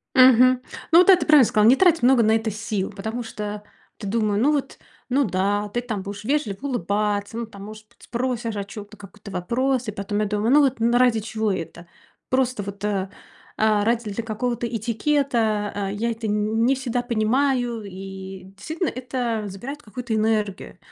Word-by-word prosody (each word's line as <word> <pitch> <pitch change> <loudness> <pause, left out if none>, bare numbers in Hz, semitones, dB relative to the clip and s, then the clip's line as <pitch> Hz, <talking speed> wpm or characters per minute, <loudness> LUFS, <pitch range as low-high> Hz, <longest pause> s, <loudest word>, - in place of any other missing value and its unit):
Мгм. 255 0 +6 0.3
Ну 335 - +8
вот 365 - +5
да, 380 - +9
ты - - -3
правильно 300 -6 +7
сказала: 215 0 +3
"Не 255 - +7
трать 335 -7 +3
много 250 -1 +5
на 220 +1 +4
это 220 -1 -1
сил". 210 -2 -3
Потому 220 +5 -5
что 210 -2 -6 0.3
ты 205 - -8
думаю: 210 -1 0
"Ну 285 +6 +3
вот, 285 -2 -2 0.3
ну 275 +3 +3
да, 205 +1 0
ты 240 +4 -2
там 215 -6 -4
будешь 200 +1 -7
вежливо 240 -6 -1
улыбаться, 205 -1 -1
ну 235 - -3
там, 200 -2 -11
может 215 0 -11
быть, - - -24
спросишь 240 -2 -3
о 200 - -2
чём-то, 205 +1 -10
какой-то 200 0 -12
вопрос". 240 +7 -1
И - - -1
потом 205 +1 -3
я 215 - +1
думаю: 210 +3 0
"Ну 300 - +7
вот 265 -4 +1
н 235 +1 +2
ради 245 -3 +4
чего 220 -1 -2
это?" 170 -1 -6 0.4
Просто 255 -4 +1
вот, 200 0 -8
э, 195 -2 -1 0.5
а, 215 -1 +2
ради 230 -2 0
для 225 +3 -4
какого-то 235 +2 -2
этикета, 225 -2 0
э, 200 -1 -2
я 230 +3 -1
это 225 -1 -4
н 210 +2 +1
не 270 +2 +3
всегда 245 -2 -2
понимаю, 240 0 0
и, 190 0 -8
действительно, 320 - -3
это 245 -3 -3
забирает 250 +10 -7
какую-то 235 +1 -6
энергию. 215 -2 -1
220 Hz, 190 wpm, -23 LUFS, 205-245 Hz, 0.5 s, да